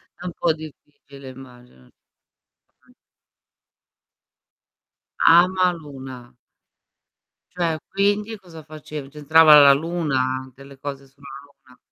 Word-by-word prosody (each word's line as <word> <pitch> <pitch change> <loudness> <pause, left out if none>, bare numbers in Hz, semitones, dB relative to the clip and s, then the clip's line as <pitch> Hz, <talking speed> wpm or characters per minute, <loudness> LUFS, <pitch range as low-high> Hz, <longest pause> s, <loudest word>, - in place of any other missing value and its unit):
È 180 - -13
un 180 - -4
po' 165 -2 +1
difficile, 145 -3 -14
immagino. 125 - -16 1.0
Mh. - - -24 2.4
Amaluna. 145 -9 -2 1.2
Cioè, 170 -3 -2
quindi 205 +2 -1
cosa 165 -5 -14
facev 150 -2 -10
c'entrava 150 +1 +5
la 140 -1 +7
luna? 135 -5 -2
Delle 140 0 -15
cose 140 -1 -8
sulla 140 +1 -18 0.2
luna? 135 -3 -24
145 Hz, 90 wpm, -21 LUFS, 135-165 Hz, 2.4 s, la